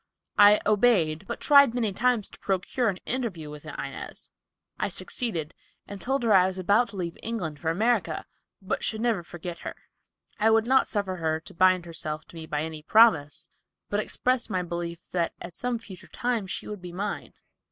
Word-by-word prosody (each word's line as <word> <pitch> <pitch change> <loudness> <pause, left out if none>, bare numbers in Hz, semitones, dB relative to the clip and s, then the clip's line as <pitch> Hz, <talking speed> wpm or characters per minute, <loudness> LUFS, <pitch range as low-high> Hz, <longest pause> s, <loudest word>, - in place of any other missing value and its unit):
I 205 +1 +8
obeyed, 195 -6 +3
but - - -4
tried 280 -5 +6
many 225 -5 0
times 235 0 +1
to - - -15
procure 200 +5 0
an 190 - -3
interview 200 -12 -3
with 150 +1 -10
Inez. 140 -2 -7 0.5
I - - 0
succeeded, 175 - -3 0.3
and 200 -1 -8
told 265 0 0
her 225 -2 +4
I 185 -1 +6
was 190 0 -3
about 205 +6 +3
to - - -11
leave 175 -3 -4
England 175 -10 -4
for 160 - -1
America, 190 -2 +1 0.4
but 190 - -2
should 220 - 0
never 230 -5 +1
forget 175 0 -7
her. - - -6 0.6
I 220 - +4
would 225 0 +4
not 265 +2 +4
suffer 195 -3 -2
her 160 -1 0
to - - -12
bind 185 0 +4
herself 155 -2 -3
to - - -14
me 160 -1 -7
by 150 0 -1
any 160 -1 -6
promise, 165 -6 +4 0.4
but 205 - +1
expressed 250 +3 0
my 185 -1 0
belief 170 0 -5
that 170 -2 -1
at 175 - -9
some 245 -1 -1
future 205 -5 -12
time 240 -5 -2
she - - -5
would 210 -3 -6
be 180 -1 -8
mine. 200 +4 -4
190 Hz, 190 wpm, -27 LUFS, 170-225 Hz, 0.6 s, I